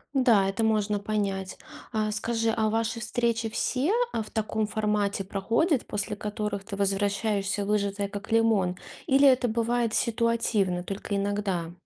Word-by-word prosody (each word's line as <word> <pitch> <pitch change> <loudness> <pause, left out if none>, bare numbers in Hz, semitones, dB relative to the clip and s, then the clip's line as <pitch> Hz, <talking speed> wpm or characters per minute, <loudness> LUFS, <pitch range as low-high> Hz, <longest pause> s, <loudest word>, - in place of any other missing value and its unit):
Н-да, 225 -7 +4
это 210 +4 -2
можно 210 -1 +1
понять. 200 -2 -2 0.4
А 215 -1 0
скажи, 225 +2 -1
а 220 -1 +1
ваши 225 +1 -1
встречи 230 0 0
все, 260 - 0 0.2
а, 225 - -1
в 210 - -12
таком 220 -1 -1
формате 210 -2 0
проходят, 230 - 0
после 210 0 -3
которых 210 -1 -4
ты 200 - -6
возвращаешься 200 0 0
выжатая 200 -1 0
как 205 +1 -7
лимон, 220 -5 +3 0.3
или 275 +1 +5
это 255 -2 +4
бывает 235 0 0
ситуативно, 225 -6 +1
только 200 +2 -4
иногда? 195 -4 -1
210 Hz, 140 wpm, -27 LUFS, 200-230 Hz, 0.4 s, или